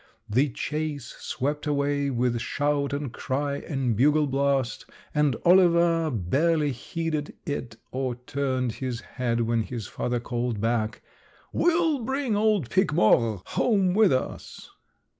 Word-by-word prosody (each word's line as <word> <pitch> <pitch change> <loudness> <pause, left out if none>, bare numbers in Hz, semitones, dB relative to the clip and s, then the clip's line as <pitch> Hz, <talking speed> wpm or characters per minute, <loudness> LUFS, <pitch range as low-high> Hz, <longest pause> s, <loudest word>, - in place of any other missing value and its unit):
The 130 +7 +2
chase 150 0 -4
swept 145 +3 -3
away 140 -1 0
with 120 -2 0
shout 145 +1 0
and 140 -3 -3
cry 140 +1 -2
and 135 -7 -2
bugle 150 +6 +4
blast, 135 -2 0 0.3
and 150 -4 +2
Oliver 170 -2 +5
barely 145 - +1
heeded 155 +4 -4
it 125 -6 -4 0.2
or 130 -1 -2
turned 130 0 -2
his 125 0 -4
head 120 -2 -2
when 115 0 +1
his 115 -1 -5
father 120 +5 -2
called 120 -2 -2
back: 115 0 -1 0.5
'We'll 330 -4 +2
bring 265 -1 -1
old 210 - +1
Pique 190 -5 +2
Mort 110 -5 +3
home 195 -6 +2
with 210 -2 +5
us.' 130 - -3
140 Hz, 130 wpm, -26 LUFS, 120-155 Hz, 0.5 s, Oliver